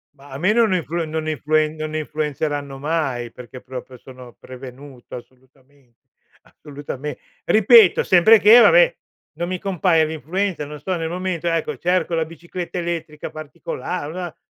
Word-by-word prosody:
Ma 140 0 -17
a 135 - -6
me 185 +8 +2
non 225 -4 +3
influe 170 -1 -2
non 155 0 -4
influen 155 +1 0
non 155 0 -5
influenzeranno 150 -2 -3
mai, 135 -6 -2
perché 125 +1 -11
proprio 130 0 -9
sono 125 -1 -13
prevenuto, 130 0 -11
assolutamen 130 +1 -17 0.5
assolutame 145 -1 -8 0.3
ripeto 215 -2 +6
sempre 190 +5 +6
che, 215 +4 +8
vabbè, - - +5 0.4
non 175 - -4
mi 185 - -3
compare 180 -4 +2
l'influencer, 160 +2 -3
non 150 0 -9
so, 185 +3 -3
nel 165 -1 -3
momento, 180 -1 -3
ecco, 165 -1 -1
cerco 175 -1 0
la 165 -1 0
bicicletta 170 +3 -7
elettrica 165 -3 -5
particola 155 +1 -6
una 175 +1 -6
155 Hz, 145 wpm, -21 LUFS, 140-175 Hz, 0.5 s, che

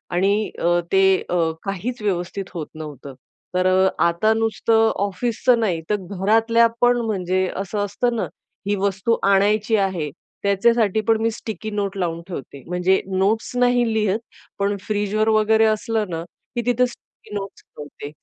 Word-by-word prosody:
आणि 200 +4 +2
अ, 175 +1 +2
ते 195 0 +4 0.3
अ, - - 0 0.3
काहीच 215 +5 -4
व्यवस्थित 190 -1 -2
होत 165 -4 -5
नव्हतं. 145 -3 -8 0.4
तर 185 0 +3
अ, 185 +1 +4 0.2
आता 170 +6 +3
नुसतं 225 0 +2
ऑफिसचं 230 +5 +1
नाही, 185 -8 0
तर 210 - +3
घरातल्या 225 +4 +3
पण 245 0 +5
म्हणजे 185 -3 0
असं 195 +2 -3
असतं 235 +4 -1
ना, 225 - -1 0.4
ही 205 - +2
वस्तू 200 +3 0
आणायची 205 +3 +3
आहे. 190 -7 0 0.3
त्याच्यासाठी 215 +1 +3
पण 225 -1 +4
मी 225 - +2
स्टिकी 220 -1 -6
नोट 200 -1 -2
लावून 170 -3 -2
ठेवते. 140 -6 -8
म्हणजे 180 +2 +2 0.2
नोट्स 210 +4 +1
नाही 245 0 +3
लिहत, 215 -1 +1 0.4
पण 200 +1 +1
फ्रीजवर 210 +1 0
वगैरे 220 0 +4
असलं 220 0 0
ना, 165 -1 -4 0.3
की 240 - 0
तिथं 245 +1 +3
स्टिकी 245 -3 -13
नोट्स 195 -1 -6
ठेवते, 145 -1 -10
205 Hz, 150 wpm, -22 LUFS, 185-220 Hz, 0.4 s, पण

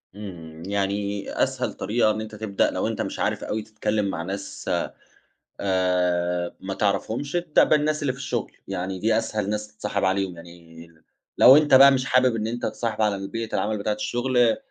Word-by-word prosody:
امم 85 -6 -9
يعني 100 0 -2
أسهل - - -2
طريقة 110 0 +1
إن 110 +1 -3
أنتَ 110 0 -8
تبدأ 105 -2 0
لو - - -1
أنتَ - - -2
مش - - -4
عارف - - -1
أوي 110 - -2
تتكلِّم 105 -1 -2
مع 90 -4 -3
ناس 100 +3 -6 0.9
آآ 90 -2 0
ما 95 0 -5
تعرفهمش، 110 - -1
ابدأ 175 -3 +3
بالناس 150 0 +2
اللي 140 -3 0
في 130 - -12
الشغل، 125 -4 -3 0.2
يعني 95 0 -4
دي 110 +2 +2
أسهل 110 -3 -2
ناس 105 0 -2
تتصاحب 105 -1 -4
عليهم، 95 -1 0
يعني 85 -1 -13 0.5
لو 130 +3 +9
أنتَ 150 -2 +2
بقى 135 +1 +9
مش 130 -1 +1
حابب 130 -2 +3
إن 110 -1 -2
أنتَ 120 +2 -4
تتصاحب 115 -2 -2
على 105 -2 +2
البيئة 110 +4 -4
العمل 110 0 0
بتاعة 105 +1 -1
الشغل، 120 +2 +1
105 Hz, 175 wpm, -24 LUFS, 95-115 Hz, 0.9 s, لو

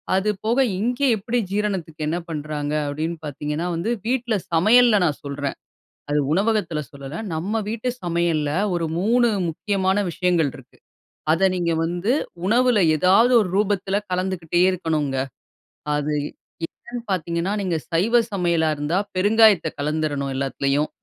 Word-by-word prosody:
அதுபோக 210 +4 0 0.2
இங்கே 245 +5 +1
எப்பிடி 225 +4 -1
ஜீரணத்துக்கு 185 -7 -2
என்ன 170 +3 -1
பண்றாங்க 150 -1 -3
அப்பிடின்னு 160 +3 -3
பார்த்தீங்கன்னா, 150 +4 -3
வந்து 170 +8 -1 0.2
வீட்ல 240 -3 0 0.2
சமையல்ல 215 +5 +5
நான் 150 - -1
சொல்றேன். 140 0 -4 0.5
அது 145 0 +2
உணவகத்தில 195 -4 +1
சொல்லல. 140 +2 -8 0.2
நம்ம 200 +8 -1
வீட்டு 230 +3 -2
சமையல்ல 170 -4 0 0.2
ஒரு 170 -1 0
3 235 +6 +3 0.2
முக்கியமான 190 +3 0
விஷயங்கள் 170 -3 +1
இருக்கு. - - -16 0.6
அத 180 +4 +3
நீங்க 170 -2 0
வந்து 175 +7 0 0.3
உணவுல 240 0 +3 0.2
ஏதாவது 195 +9 +4
ஒரு 200 - 0
ரூபத்தில 200 -1 +1
கலந்துக்கிட்டே 180 -2 -1
இருக்கணுங்க. 155 -6 -1 0.8
அது 150 +1 -1 0.5
என்னன்னு 240 +7 -9
பார்த்தீங்கன்னா, 170 +1 -1
நீங்க 180 -3 0 0.2
சைவ 225 +9 +3
சமையலா 170 -4 +1
இருந்தா 150 +5 0 0.2
பெருங்காயத்த 205 -3 +5
கலந்துரணும், 145 -2 -1
எல்லாத்திலயும். 140 +2 0
175 Hz, 125 wpm, -22 LUFS, 155-210 Hz, 0.8 s, சமையல்ல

